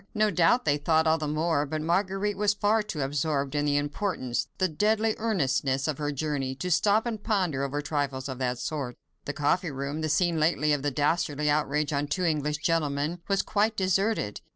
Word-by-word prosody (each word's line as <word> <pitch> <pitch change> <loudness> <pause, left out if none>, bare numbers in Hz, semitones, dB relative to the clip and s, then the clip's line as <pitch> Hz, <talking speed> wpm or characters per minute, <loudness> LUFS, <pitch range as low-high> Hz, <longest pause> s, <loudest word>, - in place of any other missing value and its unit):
No 215 0 +3
doubt 180 +8 +3
they 145 -1 +2
thought 160 +2 +2
all 160 0 +3
the 155 - -2
more, 155 0 +1
but 155 +2 -3
Marguerite 195 +4 0
was 205 +1 +1
far 210 +2 +2
too 180 -8 -5
absorbed 140 0 -1
in 145 0 0
the 145 -1 +2
importance—the 145 +1 -2
deadly 215 +6 +1
earnestness—of 140 - 0
her 145 -1 -1
journey, 140 -2 -2
to 180 +7 -4
stop 210 +6 +3
and 225 -3 -3
ponder 185 - 0
over 145 +2 -2
trifles 140 -3 -2
of 130 -2 -6
that 125 -1 -1
sort. 125 -1 -4 0.3
The 140 - -3
coffee 160 +5 +1
room—the 145 +3 -3
scene 170 +1 +2
lately 155 -1 +2
of 145 - 0
the 145 - 0
dastardly 150 0 0
outrage 150 0 0
on 145 +1 0
two 180 +5 -1
English 150 -3 0
gentlemen—was 165 +4 0
quite 215 +1 0
deserted. 190 - 0
155 Hz, 180 wpm, -27 LUFS, 145-185 Hz, 0.3 s, No